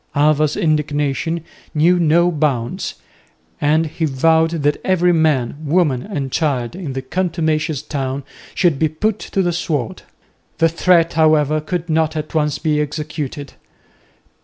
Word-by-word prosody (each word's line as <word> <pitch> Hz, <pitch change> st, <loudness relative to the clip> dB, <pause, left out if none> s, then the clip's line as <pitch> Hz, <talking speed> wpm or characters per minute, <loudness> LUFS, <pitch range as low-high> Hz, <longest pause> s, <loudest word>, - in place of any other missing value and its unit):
Alva's 150 Hz, 0 st, +2 dB
indignation 150 Hz, -1 st, 0 dB, 0.3 s
knew 175 Hz, +4 st, +4 dB
no 170 Hz, +2 st, +3 dB
bounds, 140 Hz, -7 st, -1 dB, 0.7 s
and 155 Hz, +2 st, +3 dB
he 160 Hz, +1 st, -2 dB
vowed 160 Hz, +3 st, +3 dB
that 145 Hz, 0 st, +1 dB
every 180 Hz, -1 st, +3 dB
man, 150 Hz, -6 st, +1 dB
woman 150 Hz, -4 st, +1 dB
and 140 Hz, -9 st, -4 dB
child 130 Hz, -4 st, -1 dB
in 170 Hz, -8 st, -5 dB
the 135 Hz, 0 st, -4 dB
contumacious 155 Hz, -2 st, -1 dB
town 135 Hz, -2 st, -3 dB, 0.3 s
should 170 Hz, -7 st, +2 dB
be 160 Hz, -, +2 dB
put 210 Hz, +7 st, -1 dB
to 195 Hz, -, -1 dB
the 175 Hz, -1 st, 0 dB
sword. 150 Hz, -8 st, -2 dB, 0.6 s
The 165 Hz, -, +3 dB
threat, 170 Hz, 0 st, +3 dB
however, 155 Hz, -1 st, +3 dB
could 175 Hz, +2 st, -3 dB
not 160 Hz, -1 st, +1 dB
at 155 Hz, 0 st, -5 dB
once 150 Hz, -2 st, +1 dB
be 150 Hz, -2 st, 0 dB
executed. 150 Hz, -2 st, -5 dB
155 Hz, 135 wpm, -18 LUFS, 145-165 Hz, 0.7 s, knew